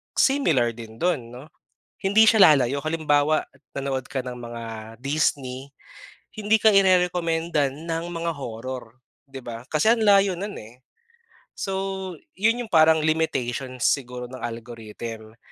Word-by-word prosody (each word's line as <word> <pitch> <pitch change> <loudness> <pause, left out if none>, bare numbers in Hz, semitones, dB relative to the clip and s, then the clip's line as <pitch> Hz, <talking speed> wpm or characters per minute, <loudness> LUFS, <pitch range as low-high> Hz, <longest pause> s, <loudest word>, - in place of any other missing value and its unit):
similar 160 - +3
din 110 -1 -11
dun, 155 -6 -1
'no. 125 +6 -12 0.5
Hindi 215 +3 +5
siya 215 -4 +7
lalayo. 135 0 +1
Halimbawa, 155 -1 +1 0.2
nanood 135 -2 -3
ka 130 - -3
ng 125 -1 -7
mga 120 -1 -7 0.4
Disney, 140 -1 -1 0.6
hindi 215 +1 +2
ka 215 -1 +4
irerekomendan 170 -5 +2
ng 165 0 -2
mga 170 -1 -3
horror, 125 -1 -7 0.3
'di 135 - -8
ba? 115 0 -6
Kasi 160 +10 +4
ang 225 - -2
layo 200 -2 +5
nun, 200 +4 -6
eh. 120 +4 -14 0.8
So, 190 -2 -3 0.2
yun 230 +5 +1
yung 225 - -14
parang 160 -1 +5
limitations 130 -5 -1
siguro 125 -3 0
ng 130 +1 -9
algorithm. 115 -1 -8
145 Hz, 130 wpm, -24 LUFS, 125-180 Hz, 0.8 s, siya